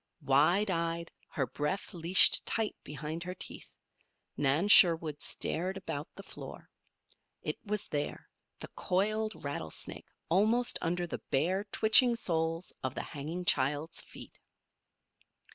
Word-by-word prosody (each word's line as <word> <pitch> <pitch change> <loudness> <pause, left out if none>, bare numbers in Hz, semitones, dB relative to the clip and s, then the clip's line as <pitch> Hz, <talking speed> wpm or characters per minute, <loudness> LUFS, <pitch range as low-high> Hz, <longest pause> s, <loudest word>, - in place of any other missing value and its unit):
Wide 165 +10 +3
eyed, 170 -1 -2 0.2
her 135 - -2
breath 150 - -4
leashed 175 +2 +7
tight 225 -2 -1
behind 150 +3 -6
her 180 +1 -6
teeth, - - -9 0.6
Nan 145 +7 +1
Sherwood 165 -6 +6
stared 185 +4 -2
about 150 -5 -5
the 200 - -10
floor. - - -10 0.7
It - - -4
was 210 -1 -3
there, 145 -1 -4 0.3
the - - -8
coiled 215 +4 -2
rattlesnake, 80 - -5 0.2
almost 220 +8 +2
under 175 +1 -1
the 170 - -6
bare, 185 +9 0
twitching 220 +4 +4
soles 165 -4 -2
of 130 -1 -3
the - - -4
hanging 160 +5 -6
child's 145 +3 +1
feet. - - -12
170 Hz, 125 wpm, -31 LUFS, 150-195 Hz, 0.7 s, leashed